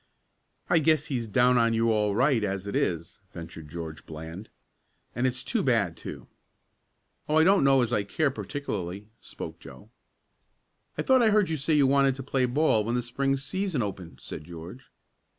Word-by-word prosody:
"I 165 - +4
guess 155 -1 +2
he's 120 -5 -3
down 125 +3 +4
on 115 -1 +3
you 115 0 +2
all 105 -2 +1
right 125 -1 +3
as 100 -1 -2
it 100 - -4
is," 85 -2 -1
ventured 80 -2 -9
George 80 -1 -7
Bland. 80 +6 -8 0.7
"And 120 +3 +1
it's 125 0 -3
too 230 - 0
bad, 110 - +1
too." - - -8 1.0
"Oh, 155 - +2
I 160 - +6
don't 195 0 +5
know 135 -2 +5
as 120 0 -2
I 105 - +2
care 140 +9 0
particularly," 105 - -5
spoke - - -8
Joe. 70 - -13 1.1
"I - - -1
thought 260 -2 +4
I 225 - +5
heard 210 -3 +3
you 160 - -1
say 150 +3 +1
you 145 -2 +5
wanted 135 0 +3
to 135 - -7
play 130 -1 +1
ball 125 -3 +2
when 115 +3 -1
the 125 - 0
Spring 135 +3 0
season 170 - -2
opened," 95 -4 -7
said - - -7
George. 85 - -10
120 Hz, 185 wpm, -27 LUFS, 100-140 Hz, 1.1 s, I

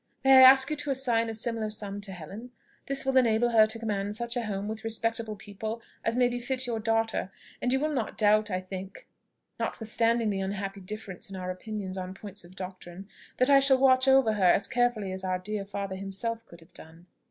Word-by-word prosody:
May 270 0 +8
I 260 - +10
ask 265 +2 +8
you - - +1
to 290 0 -4
assign 245 -4 +1
a - - -3
similar 225 -1 -2
sum 205 -1 -6
to 200 -1 -7
Helen? 195 +7 -9 0.4
This 275 -1 -2
will 265 0 +2
enable 240 -1 +3
her 220 -2 +6
to 220 +1 -4
command 205 -2 -2
such 235 +2 -3
a 245 - 0
home 200 0 -3
with 220 0 -5
respectable 225 0 -2
people 215 +2 -6 0.2
as 225 +2 0
may 250 -1 +4
befit 250 +2 -2
your 235 -2 -2
daughter; 225 -2 0 0.3
and 250 - 0
you 265 - +3
will 305 +2 -1
not 240 -6 -3
doubt, 215 0 +3
I 185 -1 -2
think, 190 +1 -8 0.5
notwithstanding 230 0 0
the 195 -1 -2
unhappy 195 0 -4
difference 195 -1 -8
in 195 - -8
our 185 -1 -4
opinions 190 -1 -5
on 185 +1 -6
points 200 -1 -9
of 175 +2 -16
doctrine, 185 0 -9 0.3
that 255 +3 +3
I 275 - +8
shall 270 -1 +4
watch 260 0 +4
over 265 -4 +5
her 190 -4 +4
as - - +2
carefully 240 -5 0
as 190 0 -6
our 185 -1 0
dear 200 +2 -5
father 200 -1 -5
himself 210 +4 -4
could 170 0 -15
have 170 +2 -21
done." 165 +2 -14
215 Hz, 215 wpm, -28 LUFS, 195-240 Hz, 0.5 s, I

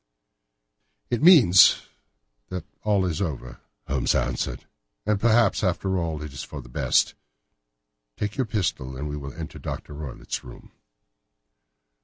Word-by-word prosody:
"It 120 - 0
means 140 - +7 0.7
that 90 -3 -5 0.2
it 105 -3 +2
is 80 +1 -3
all - - +3
over," 60 -5 -8 0.3
Holmes - - +1
answered. - - -2 0.4
"And 105 -2 +1
perhaps, 115 -1 +3
after 95 0 0
all, 80 -3 -3
it 75 -2 -8
is 65 - -6
for - - -8
the - - -11
best. - - +2 1.0
Take 105 0 -3
your 130 -4 -1
pistol, 65 - -2
and 75 +3 -4
we 75 - -4
will 70 -2 -7
enter 80 -1 -7
Dr. - - -6
Roylott's 70 -3 -6
room." 60 - -13
85 Hz, 140 wpm, -25 LUFS, 75-105 Hz, 1.0 s, means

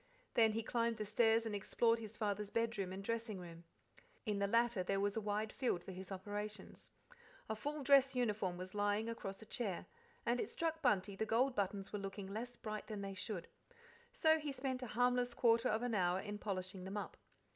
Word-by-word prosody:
Then 225 -2 +5
he 225 +1 -1
climbed 230 0 +1
the 215 - -2
stairs 225 +2 +4
and 220 - -2
explored 230 +3 +2
his 220 -1 -8
father's 210 -1 -1
bedroom 225 -5 0
and 190 +1 -5
dressing 225 -2 -2
room. 170 -1 -10 0.6
In 210 -3 0
the 200 - +2
latter 230 -1 +3
there 195 +2 0
was 205 +1 +1
a 225 - 0
wide 210 +1 -1
field 215 -10 0
for - - -7
his 185 +1 -8
operations. 205 +2 -5 0.6
A 220 - -1
full 290 +6 -3
dress 270 -1 +6
uniform 210 -7 0
was 185 +1 -6
lying 205 +1 +1
across 195 -3 -5
a - - -12
chair, 205 -6 -3 0.4
and 240 +1 +2
it - - -1
struck 325 -1 -1
Bunty 205 - +2
the 220 +3 -1
gold 250 +4 +3
buttons 200 -2 -1
were 205 - -1
looking 195 0 -5
less 240 +3 -4
bright 215 -2 -5
than 215 -2 -4
they 195 0 -4
should, 190 -3 -4 0.6
so 320 -10 +4
he 300 -2 -3
spent 260 -1 -2
a 250 - -4
harmless 245 +2 +2
quarter 235 +1 +4
of 220 +2 +1
an 245 -2 0
hour 180 -2 +2
in 205 +1 -5
polishing 185 -2 -3
them 190 +3 -4
up. 205 - -4
215 Hz, 205 wpm, -38 LUFS, 195-235 Hz, 0.6 s, dress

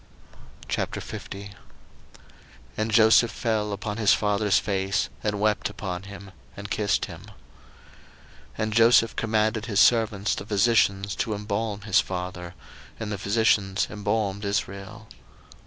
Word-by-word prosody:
01:050:001 100 -1 -5 1.2
And 110 +1 -1
Joseph 110 +1 +5
fell 110 -3 -1
upon 105 +1 -4
his 110 -3 +4
father's 105 -1 +1
face, 95 -1 -1
and 105 -1 -1
wept 105 0 +1
upon 90 -3 -5
him, 100 -1 -10 0.3
and 100 0 -8
kissed 105 -2 0
him. - - -11
01:050:002 - - -15 1.3
And 110 0 -2
Joseph 115 0 +5
commanded 110 0 0
his 105 -3 +1
servants 110 -4 +3
the - - -4
physicians 100 -2 +2
to 110 - -1
embalm 105 0 -3
his 100 -2 +3
father: 90 -1 -5 0.4
and 110 -2 -4
the 105 - -4
physicians 100 -1 +1
embalmed 105 -1 -2
Israel. 100 +1 -4
105 Hz, 125 wpm, -25 LUFS, 100-110 Hz, 1.3 s, Joseph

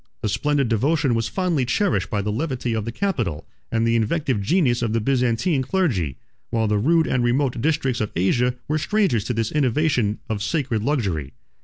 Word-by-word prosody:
The 110 - 0
splendid 145 +4 +1
devotion 135 +4 +1
was 115 -1 0
fondly 180 -8 0
cherished 190 +10 0
by 105 -2 -1
the 105 - -1
levity 125 -1 -2
of 110 -2 -2
the 115 - -3
capital, 120 - -2 0.3
and 115 0 +1
the 115 0 +2
inventive 120 0 0
genius 125 - +2
of 115 -2 -1
the 115 - +2
Byzantine 130 - +1
clergy; 120 - 0 0.3
while 110 -1 0
the 105 0 +1
rude 160 +8 +3
and 125 -2 0
remote 125 0 +1
districts 140 -4 0
of 105 - -1
Asia 120 +8 +1
were 155 +1 0
strangers 190 - +1
to 125 - -2
this 115 -1 -1
innovation 130 -6 +1
of 110 -2 -3
sacred 120 -2 -1
luxury. 100 - -1
120 Hz, 185 wpm, -22 LUFS, 110-150 Hz, 0.3 s, rude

